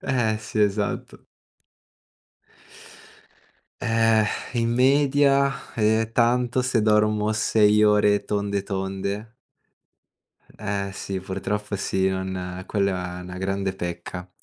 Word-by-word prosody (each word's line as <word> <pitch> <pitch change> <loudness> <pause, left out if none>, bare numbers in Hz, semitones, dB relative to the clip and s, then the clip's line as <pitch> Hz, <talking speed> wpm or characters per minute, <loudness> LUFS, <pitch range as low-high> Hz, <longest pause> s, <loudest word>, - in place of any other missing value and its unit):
Eh, 115 -4 0
sì, 105 0 -4
esatto. 105 0 -1 2.6
Eh, 115 -1 +3 0.3
in 115 -2 0
media 140 +1 +2
è 110 0 +1
tanto 125 +2 +2
se 125 -2 +1
dormo 105 0 +2
6 105 -1 +3
ore 105 -1 +4
tonde, 100 -1 -1
tonde. 100 +3 -4 1.2
Eh, 100 -1 -3
sì, 95 -1 -5
purtroppo 100 +2 -4
sì, 95 0 0
non 95 -1 -4
quella 90 -3 -1
è 90 - -8
una 90 0 -8
grande 95 0 -2
pecca, 90 0 -6
105 Hz, 100 wpm, -24 LUFS, 95-115 Hz, 2.6 s, ore